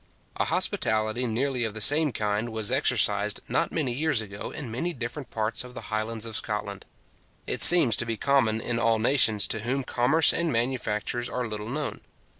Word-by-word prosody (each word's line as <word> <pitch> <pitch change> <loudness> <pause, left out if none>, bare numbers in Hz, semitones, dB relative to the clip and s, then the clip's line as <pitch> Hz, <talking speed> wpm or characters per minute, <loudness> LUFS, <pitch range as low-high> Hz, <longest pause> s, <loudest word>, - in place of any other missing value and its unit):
A - - 0
hospitality 110 +3 0
nearly 125 +2 -1
of 110 -2 -4
the - - -5
same 145 +7 +5
kind 105 +1 -2
was 110 -2 0
exercised - - +2
not - - -1
many 140 -7 -2
years 150 -1 +1
ago 100 -2 -6
in 130 -6 -6
many 170 +10 -3
different 120 0 -6
parts 110 +2 -2
of 125 0 -13
the - - -9
Highlands 110 +1 -3
of 115 -1 -7
Scotland. 105 -2 -4 0.6
It - - -2
seems 155 -11 +7
to 120 - 0
be 115 -1 -2
common 115 -4 +1
in 120 +1 -2
all 115 -1 +2
nations 110 -3 +3
to 110 - -1
whom 130 +5 -2
commerce 135 +6 +2
and 170 -2 -1
manufactures 120 -1 -2
are 125 -1 -3
little 105 0 -6
known. 150 +3 -4
115 Hz, 185 wpm, -26 LUFS, 110-135 Hz, 0.6 s, seems